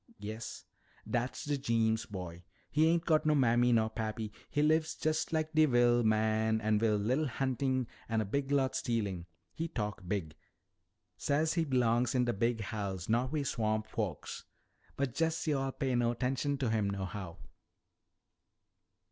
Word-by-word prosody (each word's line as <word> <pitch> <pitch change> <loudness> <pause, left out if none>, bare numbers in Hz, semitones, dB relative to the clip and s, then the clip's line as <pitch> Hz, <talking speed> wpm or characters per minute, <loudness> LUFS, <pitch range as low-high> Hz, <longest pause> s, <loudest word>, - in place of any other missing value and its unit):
"Yes." 110 +2 -7 0.4
"Dat's 120 +6 -2
de 145 -1 -1
Jeems 115 -4 +1
boy. 90 -4 -7 0.3
He 155 +2 +4
ain't 170 0 +2
got 155 -2 +3
no 155 -1 +3
mammy 120 -2 +4
nor 110 -1 +3
pappy. 110 -1 -3 0.2
He 145 - +1
lives 155 +1 +2
jest 155 +1 -1
like 155 0 -1
de 155 0 +5
wil' 120 -2 +4
man 110 0 +2
wi' 110 0 +2
a 105 -1 +2
li'l 130 +9 +1
huntin' 130 0 0 0.2
an' 115 -1 +1
a 110 - 0
big 135 +7 -2
lot 135 -2 +2
stealin'. 100 -7 -2 0.3
He 165 - -3
talk 105 -10 -4
big. 90 -6 -2 0.8
Say 145 +2 +1
he 165 +1 +1
belongs 125 -2 +2
in 125 -1 +3
de 120 - 0
big 115 +2 0
house, 100 -4 -4
not 120 +3 +1
wi' 155 -2 0
swamp 110 -4 0
folks. 105 -7 -4 0.5
But 135 -3 -1
jest 165 +3 0
yo'all 135 -3 0
pay 135 -1 -2
no 120 -1 +2
'tenshun 135 +3 -1
to 130 -5 0
him 105 -3 +1
nohow." 95 -2 -5
120 Hz, 160 wpm, -32 LUFS, 110-140 Hz, 0.8 s, de